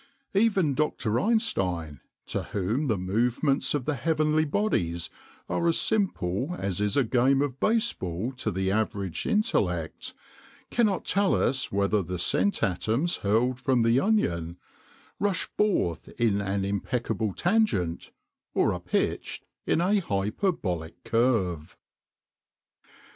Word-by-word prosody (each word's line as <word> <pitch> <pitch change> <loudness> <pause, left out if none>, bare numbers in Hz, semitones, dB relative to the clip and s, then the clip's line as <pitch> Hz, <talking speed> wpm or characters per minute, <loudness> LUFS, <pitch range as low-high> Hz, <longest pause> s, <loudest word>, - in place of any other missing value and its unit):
Even 195 -7 +3
Dr. 125 -6 0
Einstein, 90 - 0 0.3
to - - -2
whom 110 +10 -1
the 110 -5 +1
movements 120 +11 +1
of 135 -4 -2
the 150 - 0
heavenly 155 +3 +1
bodies 90 - -1 0.4
are 170 - 0
as 165 - +3
simple 175 - 0
as 95 0 -2
is 105 +3 +1
a 140 - +5
game 130 +3 +3
of 135 -2 -1
baseball 125 - 0
to 110 - -1
the 95 -1 -1
average 100 -4 -1
intellect, 90 - 0 0.6
cannot 215 -6 +1
tell 200 0 +2
us 130 0 0
whether 100 +1 +2
the 90 0 -4
scent 95 +3 +1
atoms 115 - 0
hurled 120 +5 +1
from 125 -2 +2
the 115 +3 +4
Onion 85 - 0 0.6
rush 200 -1 +1
forth 140 - 0
in 105 -4 +2
an 100 0 -1
impeccable 110 +1 -1
tangent 175 - +1 0.5
or - - +3
are - - -4
pitched - - -2 0.2
in 165 - +2
a 200 +4 +3
hyperbolic 100 - -2
curve. 105 -10 0
115 Hz, 125 wpm, -27 LUFS, 95-160 Hz, 0.6 s, a